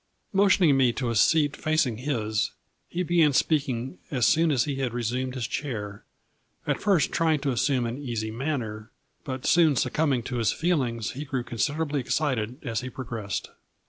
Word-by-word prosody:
Motioning 190 -6 +5
me 130 -3 +4
to 120 -2 -2
a - - -2
seat 145 +7 +3
facing 155 -7 0
his, 110 -5 -1 0.4
he 180 +1 -2
began 165 -4 +3
speaking 135 -1 0
as 130 -7 +1
soon 165 +1 +4
as 130 -5 +3
he 140 -3 -3
had 125 -3 -2
resumed 125 +2 -2
his 125 -3 -2
chair, 105 -8 -4 0.6
at - - -1
first 195 -6 +2
trying 160 -2 +2
to 140 -1 0
assume 125 0 +1
an 120 +3 -4
easy 115 -6 -3
manner, 115 -4 -3 0.3
but 130 -2 -5
soon 165 -4 +5
succumbing 135 -1 +1
to 125 +1 -4
his 115 -3 +2
feelings 130 - 0
he 140 +3 -6
grew 130 -3 -3
consid 120 +5 -1
erably 150 -2 -1
excited 125 -3 -1
as 115 -3 -1
he 130 - -5
progressed. 115 -6 -5
130 Hz, 175 wpm, -26 LUFS, 115-150 Hz, 0.6 s, Motioning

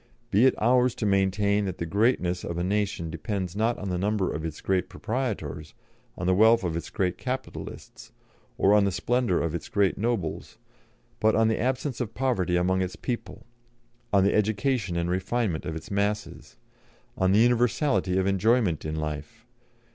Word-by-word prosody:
Be 110 +7 +5
it - - +2
ours 125 +2 +3
to - - -3
maintain 100 +1 +2
that 95 -2 -4
the 85 - -3
greatness 90 -2 +1
of 85 - -4
a 85 - -1
nation 95 -4 -1
depends 95 -4 -4
not 115 +3 +1
on 100 - -5
the 90 -1 -1
number 100 -1 0
of 80 - -4
its 80 -2 -5
great 95 -2 0
proprietors, 110 - -4 0.4
on 90 - -4
the 95 - +3
wealth 110 +3 +5
of 85 -3 -2
its 85 - -4
great 90 -2 -1
capitalists, 130 0 -6 0.5
or 105 +1 +5
the 100 -1 +1
splendour 95 +2 0
of 85 -1 -2
its 85 - -5
great 100 -2 +1
nobles, 110 -8 -2 0.6
but 110 0 +3
on 115 0 +3
the 110 - 0
absence 130 +1 -1
of 115 -2 -4
poverty 110 -9 0
among 95 +1 +1
its 90 -1 -3
people, 120 -2 -5 0.7
on 100 -2 +4
the 100 - +3
education 105 -2 0
and 85 +1 -1
refinement 95 -2 -1
of 80 - -4
its 80 +7 -8
masses, 100 +1 -2 0.6
on 95 0 +2
the 100 - +4
universality 120 -3 +2
of 95 - +1
enjoyment 100 -2 +2
in 80 0 -3
life.... 75 +4 -5
100 Hz, 175 wpm, -26 LUFS, 90-115 Hz, 0.7 s, Be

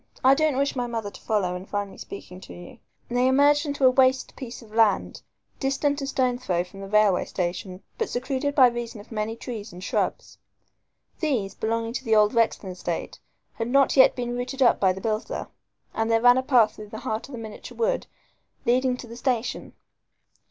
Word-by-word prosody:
I 260 +1 +7
don't 305 -1 +1
wish 280 +1 0
my 245 -1 -1
mother 225 -4 -4
to - - -13
follow 195 -5 0
and 180 +2 -8
find 205 -1 -2
me - - -14
speaking 185 -2 -9
to - - -11
you." 175 0 -12 0.3
They 245 +1 +2
emerged 290 +3 +4
into 285 -2 0
a 255 - +7
waste 260 0 +2
piece 245 -2 -8
of 215 -1 -17
land, 220 -3 +2 0.4
distant 285 +1 0
a 275 - -3
stone 255 -2 0
throw 175 -6 0
from 180 +2 -14
the 195 - -7
railway 210 -2 +3
station, 180 +1 -4 0.2
but 455 - -1
secluded 265 +3 -2
by 265 - +8
reason 235 -2 -6
of 205 - -14
many 220 0 -2
trees 225 -3 -7
and 180 +1 -10
shrubs. - - -2 0.8
These, 245 - -1
belonging 230 +2 -2
to 265 - -4
the 225 -3 +2
old 210 +1 +4
Rexton 225 -4 +1
estate, 180 - -5 0.3
had 225 - -3
not 275 +2 +3
yet 265 - +6
been 245 -1 -3
rooted 260 +2 -1
up 240 - +4
by 190 -2 +4
the 190 +1 -6
builder, 215 +1 -3 0.4
and 225 0 -1
there 225 0 +4
ran 245 +2 +6
a - - +1
path 250 -5 +3
through 210 -1 -9
the 220 +2 -8
heart 225 -3 -3
of 280 - -12
the - - -5
miniature 220 -2 -9
wood - - 0 0.6
leading 250 +1 +2
to 250 - -9
the 230 - -9
station. 245 -1 -2
235 Hz, 205 wpm, -25 LUFS, 210-260 Hz, 0.8 s, by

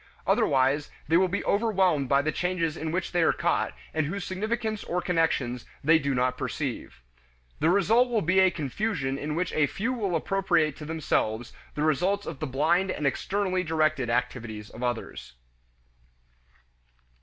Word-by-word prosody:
Otherwise, 135 +2 +2 0.2
they 160 - +2
will 185 +2 +5
be 185 +3 -3
overwhelmed 190 - +2
by 140 0 +3
the 155 - 0
changes 175 -1 -1
in 160 0 -4
which 185 +1 -2
they 175 - +1
are 160 - +4
caught - - 0 0.2
and 155 -2 0
whose 200 +4 -4
significance 215 +3 -2
or 180 - -1
connections 165 -9 0 0.2
they 160 +3 +5
do 140 -2 -1
not 125 0 0
perceive. 130 - -4 0.6
The 160 - +3
result 220 +7 +4
will 230 -3 +1
be 185 +4 +3
a 190 0 +6
confusion 140 - -2
in 150 +1 -3
which 175 +1 -1
a 150 -2 +3
few 230 - -2
will 200 -8 -1
appropriate 165 -4 +1
to 150 - -8
themselves 120 -7 -1 0.2
the 150 - -1
results 180 +7 +1
of 155 -5 -6
the 155 - -3
blind 165 +8 +2
and 150 - -3
externally 185 +6 0
directed 155 -6 +1
activities 115 -3 -3
of 115 - -10
others. 120 - -4
160 Hz, 165 wpm, -27 LUFS, 140-190 Hz, 0.6 s, a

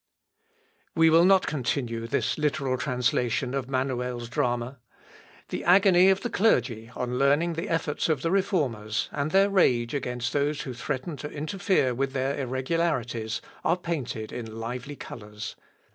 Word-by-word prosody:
We 165 0 +5
will 165 +2 +6
not 190 0 +5
continue 120 -5 -2
this - - 0
literal 140 -3 0
translation 125 -1 0
of 135 -1 -3
Manuel's 125 -2 -2
drama. 120 0 -1 0.7
The - - -4
agony 185 0 +6
of 195 0 +3
the 240 - -2
clergy 115 - +1
on 125 0 -2
learning 145 +5 +3
the 165 +1 -4
efforts 165 -1 -1
of 150 -5 0
the 165 - +1
Reformers, 140 - 0
and 145 +1 -2
their 195 +3 +4
rage 120 -11 +3
against 125 -3 -2
those 145 +1 0
who 130 - -5
threaten 130 +5 -4
to 150 - -6
interfere 155 -2 0
with 135 +2 -2
their 135 +1 0
irregularities, 130 -4 -1 0.2
are 175 - +2
painted 135 -11 -4
in 115 -2 -6
lively 125 +5 -5
colours. 105 -4 -8
135 Hz, 145 wpm, -27 LUFS, 120-165 Hz, 0.7 s, will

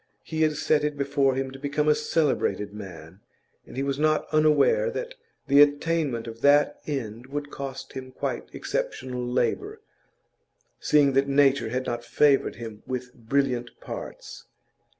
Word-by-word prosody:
He 160 -1 -3
had 155 -1 +3
set 150 -1 +2
it 150 -1 -1
before 140 -1 +1
him 135 0 -2
to 135 - -10
become 145 +2 -1
a 150 - +6
celebrated 145 - 0
man, 95 -4 -10 0.5
and - - -11
he 135 - 0
was 140 0 -2
not 155 0 +2
unaware 155 - +4
that - - -5 0.3
the 140 +1 +6
attainment 145 -4 +2
of 115 0 -9
that 145 +1 +4
end 120 -4 -4
would 145 +1 -5
cost 135 -1 -7
him 130 -1 -7
quite - - -4
exceptional 130 - -3
labour, 405 - -1 1.0
seeing 145 -2 +4
that 135 +1 +3
nature 140 -3 +3
had 130 +2 -2
not 120 0 -3
favoured 140 +3 +3
him 110 -3 -8
with 125 -1 -4
brilliant 125 0 -1
parts. - - -8
140 Hz, 150 wpm, -26 LUFS, 125-150 Hz, 1.0 s, a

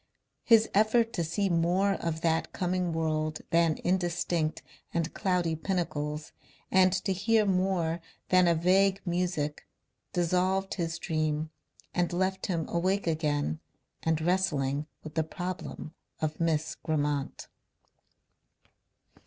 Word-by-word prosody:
His 225 -2 +6
effort 225 +3 +3
to 170 - 0
see 195 +5 0
more 180 +3 +2
of 165 -4 -3
that 165 -1 +1
coming 180 -1 -1
world 155 -1 -1
than 165 -2 +3
indistinct 175 -4 0 0.3
and 165 -1 -1
cloudy 180 -4 0
pinnacles 155 -4 -2 0.4
and 185 -1 +5
to 190 +1 0
hear 215 +3 +2
more 180 -3 +1 0.3
than 185 -1 +5
a 170 - +4
vague 190 +3 +3
music, 175 -4 -1 0.4
dissolved 185 +2 +1
his 165 -3 -2
dream 155 -1 -1 0.4
and 175 -1 +1
left 190 +2 -1
him 170 -5 -1
awake 185 +4 0
again 155 -2 0 0.4
and 160 -1 +1
wrestling 150 -5 +1 0.2
with 155 - -8
the 160 - +1
problem 175 -1 -6 0.3
of 155 -1 -2
Miss 160 -2 0
Grammont. 145 -3 -2
170 Hz, 120 wpm, -29 LUFS, 160-185 Hz, 0.4 s, His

